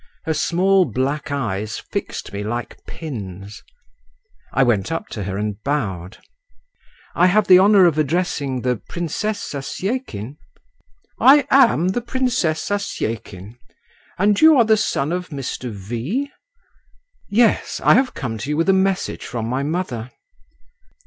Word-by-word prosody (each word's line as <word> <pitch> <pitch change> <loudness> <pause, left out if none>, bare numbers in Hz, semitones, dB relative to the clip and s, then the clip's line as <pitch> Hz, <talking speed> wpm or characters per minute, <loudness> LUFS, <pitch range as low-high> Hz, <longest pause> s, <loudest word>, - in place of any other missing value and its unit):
Her 160 - 0
small 185 +4 +2
black 140 +3 -2
eyes 110 -8 -3
fixed - - -6
me 100 +1 -4
like 120 +3 -5
pins. 100 - -8 0.9
I 135 - +3
went 110 -4 +1
up 165 +6 -4
to 105 -3 -5
her 95 0 -3
and 105 0 -3
bowed. 95 -11 -3 1.0
"I 180 - +4
have 205 +3 +3
the 185 -2 +7
honour 200 -1 +6
of 160 -3 +2
addressing 145 -4 -1
the 125 -1 0
Princess 180 - -4
Zasyekin?" 145 - -4 0.8
"I 275 +3 +6
am 230 - +5
the 215 +6 -1
Princess 240 -10 -1
Zasyekin; 115 - -4 0.6
and 205 +2 +2
you 315 -2 +7
are 235 - +5
the 220 0 +4
son 165 -8 -1
of 180 0 -3
Mr. 135 -4 -5
V.?" 120 - -4 1.0
"Yes. 225 +2 +2
I - - +6
have 255 +3 +2
come 115 -6 -4
to 115 - -5
you 150 - -1
with 165 +4 +1
a - - +6
message 190 0 0
from 115 -2 -4
my 130 +3 -1
mother." 140 -7 -3
150 Hz, 140 wpm, -20 LUFS, 115-195 Hz, 1.0 s, the